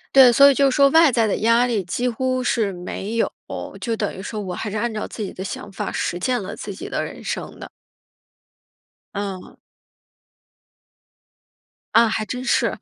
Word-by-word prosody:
对， 260 -2 +9
所 275 +4 +7
以 - - +2
就 275 +1 +3
说 275 +1 +4
外 325 -1 +6
在 230 -2 +2
的 210 - 0
压 230 +2 +3
力 230 -5 -1
几 240 +8 -1
乎 255 +2 -1
是 220 -4 +1
没 190 +4 -6
有。 230 - +1 0.5
就 230 -2 -1
等 210 -2 -2
于 190 - -7
说 215 +1 -5
我 185 -3 -5
还 210 - -4
是 210 - -3
按 235 +3 -1
照 215 - -4
自 220 - -6
己 195 - -5
的 190 - -6
想 195 +1 -6
法， 200 0 -4
实 170 - -2
践 250 +5 0
了 190 - -6
自 - - -7
己 - - -8
的 - - -2
人 - - -8
生 - - -5
的。 - - -9 1.5
嗯。 200 -2 -5 2.4
啊， 230 0 +6
还 215 0 -1
真 250 +4 -5
是。 - - +1
225 Hz, 200 characters per minute, -22 LUFS, 200-250 Hz, 2.4 s, 对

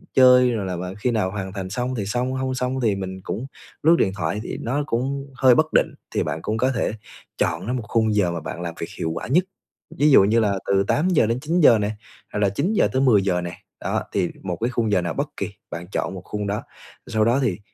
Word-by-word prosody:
chơi 125 -1 +7
rồi 110 -4 -2
là 90 - -3
bạn 90 +2 -5
khi 120 +4 -1
nào 105 -5 0
hoàn 95 -2 -5
thành 95 -2 -5
xong 125 +5 -2
thì 100 -4 -2
xong, 125 +4 -1
không 130 0 -1
xong 130 +1 -1
thì 105 -3 +2
mình 95 -1 -5
cũng 125 - -4 0.4
lướt 165 +2 +6
điện 95 - +3
thoại 80 +3 -2
thì - - -5
nó 140 +5 -1
cũng 135 +3 -2
hơi 125 -1 +5
bất 155 +2 +1
định, - - +3 0.2
thì - - +2
bạn - - -3
cũng 110 +1 -2
có 130 +3 +2
thể 115 -3 -1 0.5
chọn - - 0
lấy 125 - -2
một 125 -3 -2
khung 110 -2 +2
giờ 90 -4 +2
mà 85 - -3
bạn 85 - -6
làm 85 -1 -5
việc 85 - -4
hiệu 80 -1 -1
quả - - -5
nhất, 170 +9 +3 0.6
ví 150 0 +5
dụ 100 - +8
như 110 +4 +3
là 100 -3 +1
từ 100 0 +3
8:00 170 -3 +3
đến 115 +2 0
9:00 155 -4 +5
nè, 105 +1 0 0.4
hoặc - - -1
là 100 -1 +3
9:00 155 - +1
tới 130 - +2
10:00 100 -8 +3
nè, 85 0 -6 0.2
đó, - - -1
thì 90 - 0
một 90 -2 -2
cái 120 - +1
khung 115 -4 0
giờ 95 - +3
nào 85 -2 -2
bất - - -2
kì, - - -2 0.2
bạn 85 +1 -6
chọn - - -2
một 95 - -7
khung 105 -1 -4
đó. 105 +1 -2 0.4
Sau 110 -1 +1
đó 120 +4 +3
thì, 105 -5 0
110 Hz, 250 wpm, -23 LUFS, 95-130 Hz, 0.6 s, dụ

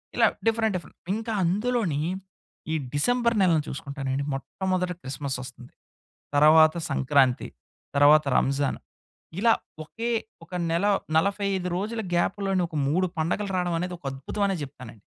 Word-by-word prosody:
ఇలా - - +5 0.2
different 225 -1 +2
different. 180 - -7 0.2
ఇంకా 225 +1 -4
అందులోని 200 -3 0 0.7
ఈ - - +1 0.2
డిసెంబర్ 235 +10 +2
నెలను 170 -5 +4
చూసుకుంటానండి 135 0 -3
మొట్టమొదట 180 +6 -2
క్రిస్మస్ 135 -1 -4
ఒస్తుంది. 125 -1 -12 0.6
తరవాత 155 +2 +7
సంక్రాంతి. 135 -2 +2 0.5
తర్వాత 150 +2 +6
రంజాన్. 140 +1 +1 0.6
ఇలా 230 +1 +5 0.3
ఒకే 230 +9 -4 0.3
ఒక 170 - -25 0.7
నెల 195 +1 +1
రోజుల 220 +5 -2
గ్యాప్‌లోని 195 +1 +1
ఒక 160 - -7
3 180 +6 +2
పండుగలు 185 +6 -1
రావడం 175 -1 0
అనేది 180 +1 -3
ఒక 165 - -39
అద్భుతం 135 +10 -5
అని 195 - 0
చెప్తానండి. 130 -6 -10
170 Hz, 125 wpm, -26 LUFS, 140-200 Hz, 0.7 s, తరవాత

